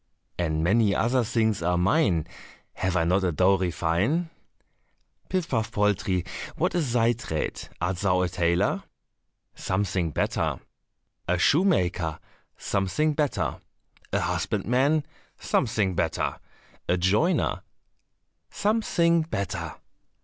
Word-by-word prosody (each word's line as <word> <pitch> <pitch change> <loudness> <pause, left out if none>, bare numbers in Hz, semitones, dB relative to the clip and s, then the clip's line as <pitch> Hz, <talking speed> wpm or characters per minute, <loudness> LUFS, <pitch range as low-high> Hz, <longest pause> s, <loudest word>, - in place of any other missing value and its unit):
And 80 -2 0
many 100 +3 +3
other 125 +2 +2
things 110 -3 0
are 90 +1 +1
mine, 90 - +2 0.5
Have 90 0 -2
I 85 - +2
not 90 +4 +2
a 90 - +1
dowry 95 +2 +3
fine? 100 - 0 1.0
"Pif 185 -3 -1
paf 115 -7 -1
poltrie, 100 -3 +1 0.3
what - - 0
is 150 -9 0
thy 120 0 +3
trade? 95 -10 -4
Art 90 +2 -1
thou 90 -1 +2
a 90 - +1
tailor?" 85 +2 +1 0.7
"Something 95 -3 -1
better." - - -1 0.7
"A 90 - +2
shoemaker?" 90 - +2 0.4
"Something 100 +11 0
better." 150 -2 -1 0.5
"A - - +1
husbandman?" 140 +6 +1 0.3
"Something 105 -6 +1
better." - - -1 0.5
"A 90 - +3
joiner?" 105 - +1 0.9
"Something 185 -6 +2
better." 95 - -4
100 Hz, 110 wpm, -26 LUFS, 90-130 Hz, 1.0 s, many